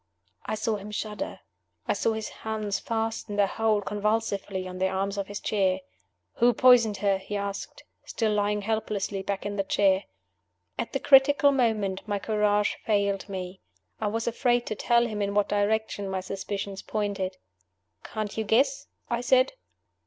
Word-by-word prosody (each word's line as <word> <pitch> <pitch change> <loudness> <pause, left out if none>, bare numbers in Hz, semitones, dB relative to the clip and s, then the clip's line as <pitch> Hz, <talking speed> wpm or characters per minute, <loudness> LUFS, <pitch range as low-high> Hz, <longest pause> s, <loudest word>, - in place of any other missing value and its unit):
I 215 - -1
saw 215 0 -1
him 200 +1 -9
shudder. 210 0 -4 0.5
I - - +3
saw 225 - +1
his 220 -1 -4
hands 215 -2 -3
fasten 225 -2 -3
their 205 -1 +4
hold 215 0 0
convulsively 205 -2 -1
on 185 0 -7
the 190 - +2
arms 195 +1 -1
of 200 -1 -3
his 205 0 -5
chair. 190 -3 +1 0.6
"Who 240 +1 +5
poisoned 235 -5 +6
her?" 195 -1 +3
he 205 +2 -4
asked, 200 0 -5 0.2
still 220 -2 -1
lying 205 0 0
helplessly 210 -2 -2
back 195 0 -3
in 205 0 -3
the 195 - +1
chair. 195 0 +2 0.7
At 230 - -3
the 275 - 0
critical 285 +1 +6
moment 220 -7 +1
my 205 -1 0
courage 210 0 +1
failed 200 -2 0
me. 185 -1 -6 0.4
I 215 - -1
was 225 +2 -1
afraid 240 +1 +1
to 215 - -3
tell 235 +2 +3
him 215 -3 -3
in 200 0 -1
what 205 -1 +2
direction 205 -1 0
my 190 -1 -2
suspicions 195 +1 -5
pointed. 200 -3 -2 0.7
"Can't 215 -2 -4
you - - +1
guess?" 265 - +2 0.2
I 235 0 -1
said. 255 - +3
210 Hz, 165 wpm, -27 LUFS, 200-220 Hz, 0.7 s, poisoned